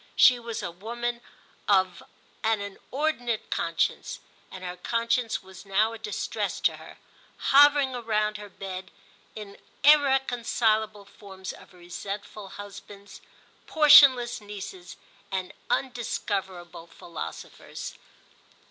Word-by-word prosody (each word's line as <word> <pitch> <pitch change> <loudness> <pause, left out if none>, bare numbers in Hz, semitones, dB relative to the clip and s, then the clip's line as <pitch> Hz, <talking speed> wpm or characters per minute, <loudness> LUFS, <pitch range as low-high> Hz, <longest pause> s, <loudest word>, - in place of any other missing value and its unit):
She 250 -2 +7
was 230 -1 -5
a - - -3
woman 235 +6 -4 0.5
of 185 -3 +3 0.4
an 220 -1 +2
inordinate 240 +3 -3
conscience, - - -1 0.3
and 185 - -10
her 180 0 -5
conscience 230 +3 0
was 190 -1 -13
now 210 +3 +1
a 230 - -8
distress 425 - -3
to - - +2
her, - - -13 0.4
hovering 285 -1 +5
round 215 -3 -1
her 205 0 -10
bed 190 -1 -7 0.5
in 205 -2 -9 0.2
irreconcilable 240 -7 +3
forms 190 -2 -9
of - - -15
resentful 195 +3 -7
husbands, 200 0 -11 0.5
portionless 275 -6 +7
nieces 195 -3 -9 0.3
and 190 -1 -3 0.2
undiscoverable 195 -9 -3
philosophers. 170 -1 -8
210 Hz, 105 wpm, -27 LUFS, 195-240 Hz, 0.5 s, She